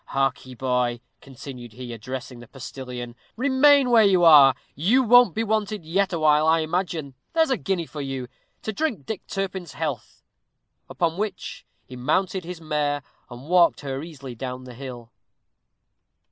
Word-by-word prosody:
Hark 135 -1 -1
ye, 130 - -10
boy," 125 -1 0 0.2
continued 125 -3 -10
he, 125 0 -8
addressing 125 +2 -7
the 120 - -12
postilion; 125 -2 -8 0.2
"remain 275 +1 +4
where 230 -2 +7
you 190 -3 +4
are; 145 -6 +8 0.2
you 220 - +3
won't 245 -5 +6
be 225 - 0
wanted 215 -4 -1
yet 190 +5 +1
awhile, 155 -2 +3
I 160 0 +4
imagine. 160 -3 -2 0.2
There's 320 -3 +3
a - - +4
guinea 190 -5 -2
for 150 -1 -7
you, 135 -2 -4 0.4
to 220 - -3
drink 225 - -2
Dick 220 - -4
Turpin's 190 -3 -4
health." - - -5 0.7
Upon 170 -1 -1
which 205 -3 -5 0.2
he 130 - -11
mounted 180 +8 -1
his 180 -1 -7
mare, 150 -2 -1 0.3
and 125 +3 -11
walked 175 0 +4
her 135 -1 -4
easily 140 -6 -9
down 125 +2 -6
the 125 -1 -10
hill. 120 -2 -9
155 Hz, 160 wpm, -24 LUFS, 130-195 Hz, 0.7 s, are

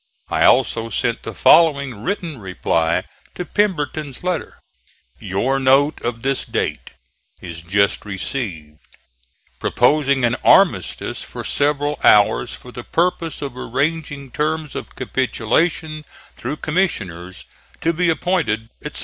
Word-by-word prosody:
I - - +2
also 115 -3 +3
sent 110 - -1
the - - -7
following 140 -9 +4
written 170 - -3
reply 85 -4 0 0.3
to 180 - -4
Pemberton's 155 -8 -1
letter: 180 -2 -3 0.6
"Your 125 +9 0
note 135 +3 +3
of 115 -1 -4
this 135 0 0
date - - -3 0.5
is 85 -2 -7
just 100 +4 +1
received, 95 - -5 0.8
proposing 140 0 +2
an 120 +1 +1
armistice - - +3
for - - -7
several 145 0 0
hours, 105 +3 +5
for 125 - -13
the 120 - -8
purpose 170 -1 -1
of 135 -3 -5
arranging 140 +1 -2
terms 155 +1 -2
of - - -7
capitulation 150 +5 -1 0.3
through 135 +6 -5
commissioners, 95 - -2 0.4
to 165 - +1
be 175 +1 +1
appointed, 155 -11 0
etc. - - -5
135 Hz, 120 wpm, -20 LUFS, 110-155 Hz, 0.8 s, hours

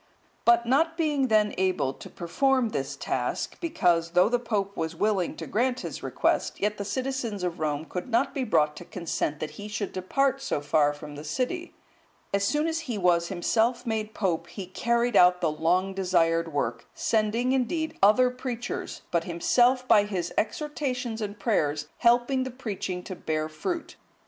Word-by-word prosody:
But 235 0 +5
not 320 +7 +2
being 295 -5 +1
then 215 -2 +3
able 185 -8 +1
to - - -11
perform 255 +8 +1
this 140 -7 -3
task, 125 -2 -2
because, 175 - +1
though 180 +3 +5
the 245 0 +2
Pope 205 -4 -2
was 160 0 -3
willing 195 -1 0
to - - -6
grant 250 +4 0
his - - -6
request, - - 0
yet 210 +1 -1
the - - -1
citizens 235 -2 -3
of 175 -1 -2
Rome 150 0 -1
could 180 +8 -5
not 235 +3 +1
be 270 - -1
brought 150 -10 +2
to - - -8
consent 165 -4 -3
that 155 - -4
he 205 - -6
should 205 -1 -4
depart 270 +9 0
so 270 - -1
far 145 0 +2
from 145 0 -9
the 145 +1 -8
city, 260 - -3 0.6
as 200 0 +2
soon 295 +9 +1
as 325 0 0
he 230 - -1
was 175 -3 +3
himself 225 +7 +1
made 220 -2 -2
Pope, 170 -4 -1
he 185 +3 -7
carried 235 +5 0
out 180 -1 +6
the 165 -3 +1
long 180 +5 +1
desired 165 -3 +1
work, 130 -5 -2
sending, 225 +3 +1
indeed, 270 +5 0
other 250 +6 +5
preachers, 250 -1 -5
but 170 -1 +1
himself 245 +9 +2
by 205 -4 +6
his 180 -4 -3
exhortations 250 -3 -2
and 205 0 -4
prayers 150 -10 0
helping 245 +2 +3
the 260 - -4
preaching 200 -7 -4
to 185 - -6
bear 155 -2 -2
fruit. 245 - -4
205 Hz, 175 wpm, -27 LUFS, 170-250 Hz, 0.6 s, out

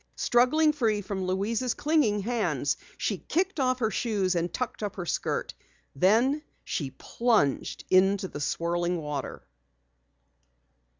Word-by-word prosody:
Struggling 300 +6 +3
free 220 -7 +1
from 190 -1 -4
Louise's 220 +6 0
clinging 285 -10 +2
hands, 235 +2 0 0.2
she - - -1
kicked 370 0 -1
off 255 -1 +2
her 225 -3 0
shoes 200 -6 0
and 170 0 -1
tucked 250 -3 -4
up 205 -2 -3
her 180 - -5
skirt. - - -2 0.4
Then 230 - +3 0.2
she 140 -4 -3
plunged 215 - 0
into 190 +1 +4
the 145 - -7
swirling 175 +3 -1
water. 150 -3 -5
210 Hz, 125 wpm, -28 LUFS, 180-250 Hz, 0.4 s, into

